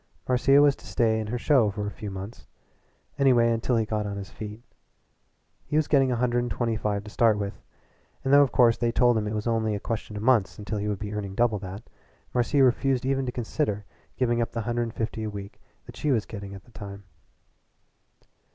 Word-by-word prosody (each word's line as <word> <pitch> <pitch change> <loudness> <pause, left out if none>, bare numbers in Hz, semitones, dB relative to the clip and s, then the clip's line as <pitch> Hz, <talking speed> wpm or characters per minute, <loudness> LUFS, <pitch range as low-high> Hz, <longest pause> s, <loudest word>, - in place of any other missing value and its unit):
Marcia 135 +2 +4
was 145 -1 +5
to - - -15
stay 110 -2 +1
in 110 - -3
her 120 +3 -2
show 120 -4 +3
for 105 +1 -4
a 105 - -3
few 105 +2 -7
months 95 +3 -8 0.7
anyway 120 -4 +4
until 115 +2 0
he 110 -1 +2
got 105 0 -1
on 100 0 -4
his 100 -1 -7
feet. 105 +2 -8 1.0
He 150 - -3
was 155 -1 +3
getting 135 -3 +3
a - - +1
hundred 120 0 +1
and 120 0 -2
twenty 115 -2 -1
five 105 -2 -2
to 105 - -10
start 110 -2 +3
with, 100 -1 -5 0.6
and 135 - +1
though 145 - +9
of 140 - +3
course 120 -2 +4
they 120 -1 +1
told 120 +1 +4
him 105 -1 0
it 105 - -3
was 105 - -3
only 110 -2 +1
a - - -3
question 110 -1 -4
of 105 - -5
months 115 -6 +3
until 105 0 -4
he 105 - -2
would 105 -1 -1
be 105 +1 -6
earning 100 -2 -4
double 115 -2 +2
that, 95 +3 -7 0.5
Marcia 130 +3 +3
refused 130 0 +2
even 135 -1 0
to - - -1
consider 110 -3 -2 0.3
giving 120 -2 +1
up 115 0 -2
the 115 - -2
hundred 120 +2 -1
and 115 -1 -4
fifty 110 0 -3
a 110 - -2
week 100 -1 -9 0.2
that - - -11
she 150 - -2
was 115 -5 +1
getting 100 -3 -8
at 95 - -11
the 120 - -21
time. 100 -2 -9
115 Hz, 225 wpm, -26 LUFS, 105-125 Hz, 1.0 s, though